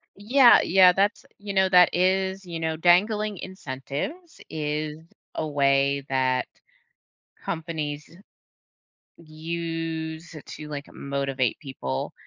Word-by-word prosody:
Yeah. 240 +5 +6
Yeah, 180 0 +6
that's 200 +4 0
you 200 0 -6
know, 190 -1 +3
that 180 -1 +7
is 190 +1 +1
you 170 -2 -6
know, 160 -1 -1
dangling 205 +5 +2
incentives 185 - -6
is 150 0 -3 0.4
a 155 - -2
way 140 -1 +1
that 130 -1 +1 1.0
companies 155 -3 -4 1.1
use 165 0 -5
to, 150 - -9
like, 145 -1 -6
motivate 140 -3 -2
people. 65 - -5
160 Hz, 105 wpm, -25 LUFS, 145-190 Hz, 1.1 s, that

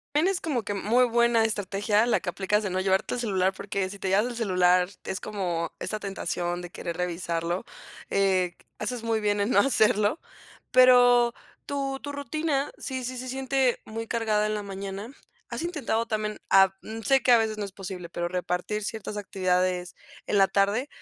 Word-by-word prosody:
Tienes 355 +5 +2
como 280 -7 -1
que 205 - -4
muy 230 +6 +3
buena 235 -1 +3
estrategia 205 +1 +1
la 240 - +2
que - - -6
aplicas 195 +4 0
de 200 - -2
no 185 - -1
llevarte 190 +1 +1
el - - -3
celular, 190 -5 +1
porque 195 -1 -3
si 200 - -8
te 195 - -4
llevas 205 +4 +3
el 245 -1 -5
celular 180 -4 +3
es 190 - -4
como 175 -6 -3
esta 215 - -2
tentación 180 -3 -3
de 175 - -8
querer 170 -1 -5
revisarlo, 170 0 -2 0.5
eh, 190 -3 +2 0.2
haces 225 +2 -3
muy 225 -1 0
bien 205 -1 +1
en 200 +3 +1
no - - +3
hacerlo. 215 -1 +3 0.5
Pero 245 -2 +6 0.3
tu 275 -1 -2
tu 285 0 -6
rutina, 285 0 -1
sí 260 -1 -4
sí 255 +1 -4
se 255 - -5
siente 265 -1 0
muy 225 +1 -5
cargada 220 -2 +1
en 215 - -1
la 210 - -3
mañana, 195 +2 -6 0.4
¿has - - -4
intentado 265 -10 -1
también, 215 -2 -2
ah, 195 -1 +6
mm, 220 +1 -7
sé 270 +5 +4
que 250 - +5
a 235 - +8
veces 220 -1 -1
no 210 - -2
es 200 - -7
posible, 185 -2 -7
pero 175 0 -3
repartir 180 +4 -2
ciertas 215 -1 -5
actividades 185 -2 -1 0.3
en 205 - +2
la 195 - +6
tarde? 205 +7 +1
210 Hz, 190 wpm, -27 LUFS, 190-240 Hz, 0.5 s, a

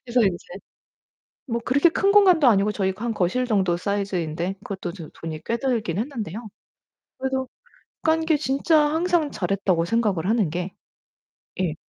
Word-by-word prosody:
그래서 245 +1 +2
인제 190 -4 0 1.0
뭐 235 -1 -1
그렇게 285 +7 +4
큰 395 +4 +2
공간도 370 -8 +6
아니고 210 -2 +4
저희 190 -2 0
거 210 - -9
한 230 - -1
거실 210 +7 0
정도 190 -6 +1
사이즈인데 185 -3 -2
그것도 190 -3 -5
도 165 -6 -9
돈이 160 -1 -7
꽤 235 - -1
들긴 230 -10 -1
했는데요. 225 - -5 0.7
그래도 265 0 -2 0.6
깐 320 0 +2
게 320 -2 +3
진짜 285 +3 +2
항상 330 -2 +1
잘했다고 185 -2 0
생각을 205 -5 0
하는 215 -7 +2
게 180 +3 -4 0.9
예. 165 -4 0
215 Hz, 315 characters per minute, -23 LUFS, 185-265 Hz, 1.0 s, 공간도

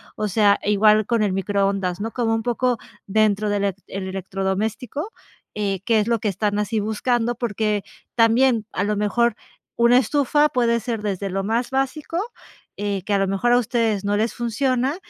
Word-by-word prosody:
O 215 - -2
sea, 205 0 +3
igual 210 +1 +4
con 230 -2 +1
el 200 -3 0
microondas, 195 -1 0
¿no?, 225 +2 -3
como 225 -2 0
un 225 - -2
poco 245 0 0 0.3
dentro 215 0 +2
del 205 - +1
elec 195 -1 -1
el 190 0 -5
electrodoméstico, 195 - -3 0.4
eh, 200 -2 -1
qué 225 0 +3
es 210 - 0
lo 235 -1 +1
que 210 - -2
están 205 +1 -1
así 215 +1 -1
buscando, 230 +3 0
porque 215 -3 -1 0.3
también 230 -1 +3
a 190 - -1
lo 210 +1 0
mejor 210 +3 +1 0.4
una 235 +1 +6
estufa 290 +4 +2
puede 235 -2 +1
ser 230 -1 -4
desde 200 -1 -2
lo 195 +1 -2
más 230 +4 -1
básico, 270 +5 -2 0.6
eh, 200 -2 -2
que 210 - -1
a 200 - +4
lo 195 - +1
mejor 195 +5 +1
a - - +6
ustedes 225 -4 0
no 205 - +1
les 225 +2 0
funciona, 255 +3 0
215 Hz, 185 wpm, -22 LUFS, 200-240 Hz, 0.6 s, una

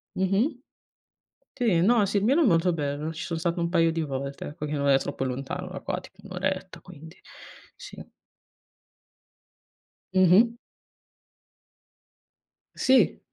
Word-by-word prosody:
Mh-mh. 205 - 0 1.0
Sì, 215 -9 +2
no, 215 +2 +4
Sirmione 225 - +2
è - - +3
molto 175 -2 +3
bello, 150 0 -3
ci 160 - -7
son 165 -2 -3
stato 170 +1 -1
un 170 - 0
paio 165 -2 +2
di 165 - -2
volte, 140 -2 -4
ecco, 150 +1 -7
che 150 - -5
non 140 -1 0
è 135 -1 +5
troppo 140 -1 -5
lontano 135 +8 -4
da 185 0 -7
qua, - - -3
tipo 190 +1 -17
1 200 - -11
oretta, 190 0 -3
quindi 160 -2 -13 0.6
sì. - - -10 2.1
Mh-mh. 185 +5 +5 2.2
Sì. 260 0 +3
175 Hz, 130 wpm, -26 LUFS, 155-190 Hz, 2.2 s, è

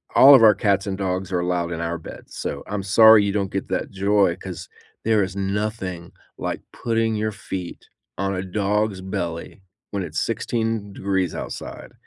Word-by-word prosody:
all 140 +1 +10
of 125 - +6
our 105 -2 +7
cats 100 -2 +1
and 95 -1 -2
dogs 95 -1 -2
are 90 - +1
allowed 90 -1 -1
in 85 - -4
our 85 0 -2
beds, 80 - -11
so, 70 - -4
I'm 105 -1 -3
sorry 110 +2 +7
you 100 - 0
don't 100 -1 -1
get 95 - -3
that - - -2
joy, 100 -2 +2
'cause 90 -3 -8 0.4
there 110 -2 +3
is 95 0 -5
nothing 100 -3 -3 0.3
like - - -3
putting 115 -1 0
your 110 0 -1
feet 95 -3 -7 0.3
on 95 +1 -1
a 90 - -2
dog's 100 +1 -1
belly 85 0 -5 0.3
when 100 -2 -2
it's 80 -3 -3
16 115 -3 -2
degrees 95 -3 -1
outside. - - -7
95 Hz, 180 wpm, -23 LUFS, 90-105 Hz, 0.4 s, all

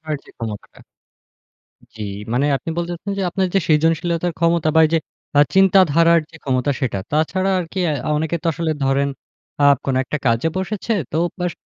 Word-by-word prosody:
করার 155 -2 -3
যে - - -16
ক্ষমতাটা। 110 -3 -7 1.2
জ্বী। 110 - -7 0.3
মানে 130 +4 +2
আপনি 165 - -7
বলতে 170 0 -2
চাচ্ছেন 195 +2 -3
আপনার 190 -1 0
যে - - +5
সৃজনশীলতার 165 +2 +1
ক্ষমতা 170 -1 +2
বা 160 - +7
এইযে 165 +1 +1 0.4
আ - - +7 0.2
চিন্তাধারার 170 -4 +5
যে - - -14
ক্ষমতা 130 +1 0
সেটা। 115 -7 -1
তাছাড়া 185 +5 +1
আর 175 - -3
কি 190 - -2
আ - - 0 0.2
অনেকে 160 +2 -1
তো - - -1
আসলে 165 0 -2
ধরেন 135 +1 +1 0.5
আ - - +3 0.2
কোন 135 - 0
একটা 150 - -3
কাজে 115 +6 +2
বসেছে 210 +4 -3 0.2
তো 155 - -1 0.2
বাস 180 -1 -1
165 Hz, 175 wpm, -20 LUFS, 145-175 Hz, 1.2 s, বা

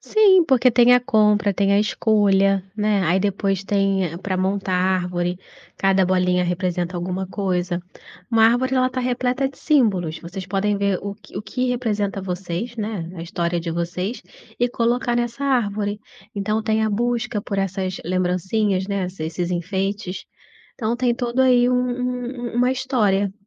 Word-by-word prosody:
Sim, 390 -5 +5
porque 260 -4 +4
tem 240 +1 +6
a 250 - +4
compra, 210 -3 +3
tem 200 +1 +1
a 200 - +4
escolha, 195 -3 +2
né, 210 -2 +1
aí 175 +3 +2
depois 195 -1 -1
tem 195 -4 0
pra 190 0 -3
montar 190 +1 -1
a - - +3 0.2
árvore, 180 0 -2 0.4
cada 195 -1 +3
bolinha 180 -1 +2
representa 180 0 -2
alguma 185 +2 -3
coisa. 180 -2 -2 0.5
Uma 225 -1 +5
árvore 260 +3 +2
ela 255 0 +3
tá 255 0 -3
repleta 250 +2 0
de 275 - -17
símbolos, 195 - +1
vocês 180 +2 -7
podem 200 +2 0
ver 200 -2 +1
o 200 0 -4
que 205 -2 -15
o 200 - -3
que 250 +4 -2
representa 210 -5 -1
vocês, 185 +5 -4
né, 205 -6 -4
a 165 - -6
história 170 +1 -2
de 170 0 -4
vocês 180 +6 -3 0.4
e 245 0 +2
colocar 240 +1 0
nessa 240 +3 -2
árvore. 210 -6 0 0.3
Então 210 +2 -1
tem 220 0 +1
a 215 - 0
busca 235 0 -1
por 200 - -3
essas 190 -1 -2
lembrancinhas, 185 +2 0
né, 200 -2 -1
esse 180 -3 -6
esses 170 +2 -3
enfeites. 190 +2 -3 0.5
Então 230 0 -2
tem 245 -1 +1
todo 240 +1 -1
aí 250 -1 +5
um 250 - +2
um 250 -1 -2
uma 250 +1 +3
história. 215 -7 +1
200 Hz, 165 wpm, -22 LUFS, 185-240 Hz, 0.5 s, tem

